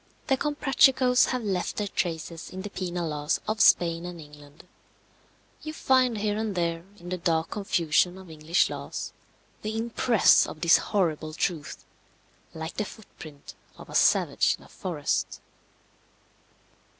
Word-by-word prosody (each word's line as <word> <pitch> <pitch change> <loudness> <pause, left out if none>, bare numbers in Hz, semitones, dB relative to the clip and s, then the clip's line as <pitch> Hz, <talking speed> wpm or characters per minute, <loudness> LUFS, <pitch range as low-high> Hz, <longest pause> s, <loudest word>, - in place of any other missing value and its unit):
The 270 - +2
Comprachicos 265 -3 +3
have 250 -2 -2
left 190 -4 -2
their 210 - -1
traces 165 -3 -4
in 190 0 -7
the 205 - -7
penal 175 -3 -3
laws 150 0 -1
of 215 0 -1
Spain 170 -1 +4
and 175 -1 -7
England. 150 +1 -15 0.9
You 310 - -6
find 255 -6 +2
here 210 0 -1
and 220 -3 -2
there 170 -1 -1
in 175 -1 -10
the 185 0 -3
dark 165 -1 0
confusion 180 -2 +1
of 190 -1 -12
English 160 +3 +1
laws - - -6 0.5
the 215 +1 -3
impress 230 0 +4
of 155 - -9
this 170 0 +6
horrible 160 -6 -1
truth, 165 -4 -3 0.7
like 160 +2 -6
the 215 - -1
foot 220 +1 -14
print 145 -3 -11 0.2
of - - -12
a - - -9
savage - - +3
in - - -18
a - - -18
forest. 165 -6 -3
180 Hz, 150 wpm, -26 LUFS, 160-215 Hz, 0.9 s, this